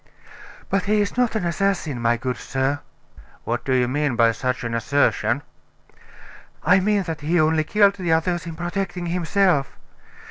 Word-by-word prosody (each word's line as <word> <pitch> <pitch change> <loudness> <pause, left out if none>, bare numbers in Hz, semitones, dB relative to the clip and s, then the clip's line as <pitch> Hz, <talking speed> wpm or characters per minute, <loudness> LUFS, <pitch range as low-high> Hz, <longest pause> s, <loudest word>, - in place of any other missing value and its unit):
"But 195 -1 0
he 210 +1 +2
is 205 -1 -1
not 245 -2 +1
an 215 - -1
assassin, 170 -7 -1
my 120 0 +2
good 125 +1 -3
sir." 135 +2 -1 0.6
"What 120 +1 -2
do 135 - -3
you 125 -1 +3
mean 145 0 0
by 115 0 +4
such 125 +2 -3
an 120 -1 -3
assertion?" 120 0 +1 1.2
"I 180 +4 +5
mean 205 +1 +1
that 165 -3 -5
he 165 +4 +1
only 155 0 +3
killed 200 +3 +3
the 180 -3 -2
others 170 +2 0
in 165 - -6
protecting 175 +1 -3
himself. 175 -3 +1
160 Hz, 165 wpm, -22 LUFS, 130-190 Hz, 1.2 s, I